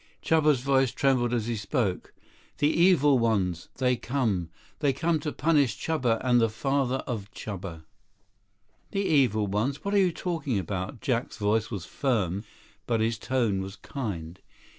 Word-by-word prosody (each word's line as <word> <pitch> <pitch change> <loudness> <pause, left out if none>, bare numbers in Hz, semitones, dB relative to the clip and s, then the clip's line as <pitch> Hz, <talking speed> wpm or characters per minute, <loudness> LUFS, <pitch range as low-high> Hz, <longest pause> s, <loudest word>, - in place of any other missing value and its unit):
Chuba's 150 -5 +3
voice 135 -1 +2
trembled 130 -2 +2
as 120 -3 0
he 120 0 -1
spoke. 105 -3 -2 0.5
"The 145 - +3
evil 150 -7 +4
ones. 95 -7 0
They 125 -1 +2
come. 110 -11 -1 0.3
They 145 -3 +2
come 160 +4 +1
to 150 0 -3
punish 145 -10 +2
Chuba 125 -8 0
and 120 -2 +4
the 115 - +3
father 135 +3 0
of 105 -5 -4
Chuba." 95 -6 -6 1.1
50 - - -26
"The 200 0 0
evil 125 - +3
ones? 110 - -2
What 200 - -1
are 205 - +5
you 185 -2 +3
talking 160 - -2
about?" 95 +3 -4
Jack's 120 -2 -1
voice 110 +1 +1
was 100 -6 -5
firm, 100 -5 -1 0.4
but 115 -2 +1
his 115 +1 0
tone 115 -7 0
was 95 +1 -6
kind. 90 - -6
120 Hz, 160 wpm, -27 LUFS, 105-140 Hz, 1.1 s, are